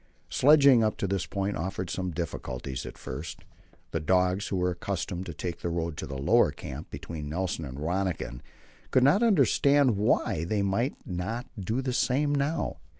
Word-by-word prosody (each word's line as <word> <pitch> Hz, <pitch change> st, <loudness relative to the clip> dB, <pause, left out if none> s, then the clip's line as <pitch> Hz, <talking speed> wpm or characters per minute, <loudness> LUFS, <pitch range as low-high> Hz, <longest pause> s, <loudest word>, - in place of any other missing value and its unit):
Sledging 140 Hz, -4 st, +6 dB
up 110 Hz, -, 0 dB
to -, -, -1 dB
this 95 Hz, -1 st, -1 dB
point 100 Hz, 0 st, -2 dB
offered 95 Hz, +2 st, -3 dB
some 95 Hz, -1 st, -2 dB
difficulties 70 Hz, -6 st, -4 dB
at -, -, -9 dB
first. 70 Hz, +6 st, -7 dB, 0.5 s
The 80 Hz, -, -1 dB
dogs, 90 Hz, +4 st, +2 dB
who -, -, -2 dB
were 90 Hz, 0 st, +1 dB
accustomed 95 Hz, 0 st, -4 dB
to 85 Hz, -, -5 dB
take 85 Hz, +2 st, -4 dB
the 85 Hz, -, -2 dB
road 85 Hz, -1 st, -2 dB
to -, -, -5 dB
the 70 Hz, -, -5 dB
lower 65 Hz, -, +4 dB
camp -, -, -8 dB
between 75 Hz, -3 st, -6 dB
Nelson 85 Hz, -1 st, -2 dB
and 65 Hz, -1 st, -7 dB
Rönniken 85 Hz, -5 st, -2 dB, 0.5 s
could 130 Hz, -, +4 dB
not 145 Hz, -, +5 dB
understand 140 Hz, -, +4 dB
why 100 Hz, -4 st, +1 dB
they 100 Hz, +4 st, 0 dB
might 115 Hz, +8 st, 0 dB
not 100 Hz, +7 st, -3 dB
do 110 Hz, +7 st, -1 dB
the 130 Hz, -1 st, -1 dB
same 145 Hz, +4 st, +1 dB
now. 145 Hz, +3 st, -1 dB
95 Hz, 175 wpm, -28 LUFS, 85-120 Hz, 0.5 s, Sledging